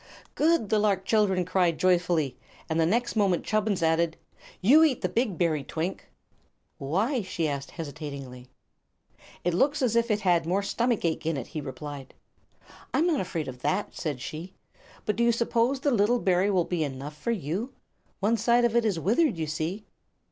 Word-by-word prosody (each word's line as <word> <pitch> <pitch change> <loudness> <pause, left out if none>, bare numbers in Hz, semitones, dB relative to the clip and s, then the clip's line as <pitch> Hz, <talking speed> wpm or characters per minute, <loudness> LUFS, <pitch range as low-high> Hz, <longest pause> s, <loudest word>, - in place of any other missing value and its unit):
"Good!" 320 -9 +2
the 215 - +3
lark 200 -2 +1
children 195 -5 +2
cried, 175 -2 +1
joyfully; 175 -7 +2 0.3
and 160 0 -1
the 160 - +3
next 240 +6 0
moment 195 -5 +2
Chubbins 210 -4 0
added: 165 0 +2 0.4
"You 275 +12 +6
eat 290 -6 +2
the - - +1
big 225 -7 -1
berry, 160 -5 +1
Twink." 160 - -4 0.7
"Why?" 205 - 0
she 175 -4 -2
asked, 140 -1 -4
hesitating. 140 -5 -7 1.0
"It 175 - +1
looks 275 - +2
as 235 -3 +1
if 235 0 +2
it 210 -1 +1
had 175 -4 +2
more 190 +3 +1
stomach 230 +1 0
ache 160 -1 -1
in 165 -3 0
it," 130 - -4
he 155 - -6
replied. 140 0 -8 0.8
"I'm 325 - +2
not 335 -5 +2
afraid 170 -5 -3
of 125 -1 -8
that," 195 +8 -1
said 145 -7 -4
she. 165 +7 -7 0.5
"But 210 - -1
do 235 - +2
you 235 - +5
suppose 235 +3 +1
the 285 - +2
little 230 +1 +3
berry 185 0 +2
will 185 -4 +2
be 175 -3 -1
enough 140 +1 -6
for 195 - -5
you? 205 - -2 0.5
One 220 +4 +2
side 240 +1 +3
of 235 -1 0
it 235 -1 +3
is 200 -6 0
withered, 230 - +2
you 160 - -1
see." 160 +7 -3
185 Hz, 185 wpm, -27 LUFS, 160-230 Hz, 1.0 s, You